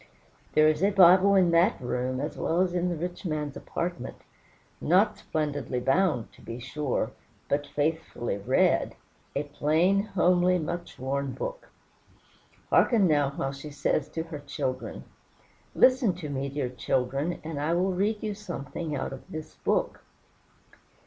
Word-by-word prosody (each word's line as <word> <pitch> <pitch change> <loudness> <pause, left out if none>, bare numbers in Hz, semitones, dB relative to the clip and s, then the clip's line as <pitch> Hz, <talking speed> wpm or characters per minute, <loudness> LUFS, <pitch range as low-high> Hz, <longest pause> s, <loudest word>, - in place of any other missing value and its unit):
There 155 0 +6
is 155 +1 +2
a 200 - +4
Bible 190 0 +6
in 180 -3 +4
that 170 +6 +3
room, 125 0 -2
as 150 +3 -3
well 170 +2 0
as 185 -1 +1
in 180 0 0
the 175 - -1
rich 175 +4 -5
man's 150 -5 -3
apartment. 170 -7 -4 0.7
Not 195 +6 +3
splendidly 145 -5 -2
bound, 135 -1 +1
to - - -18
be 115 - -7
sure, 130 -2 -2 0.4
but 145 0 0
faithfully 145 -8 -2
read 100 - +2 0.4
a 140 - 0
plain, 160 +7 +2
homely, 180 -3 +3
much 170 +1 -5
worn 135 +1 -2
book. - - -6 1.0
Hearken 225 -6 +5
now 145 -4 +3
while 135 - -2
she 140 +2 -8
says 145 0 -1
to 160 - -3
her 165 -3 -7
children, 130 -2 -4 0.7
"Listen 255 -7 +4
to 165 -4 -6
me, 140 0 -2
dear 140 -2 -2
children, 135 +5 -1
and 155 -2 -5
I 160 +3 +1
will 185 +2 +1
read 205 +4 0
you 215 -1 -1
something 170 -6 -5
out 135 0 -3
of 135 - -11
this 155 0 -7
book. - - 0
155 Hz, 150 wpm, -27 LUFS, 140-180 Hz, 1.0 s, There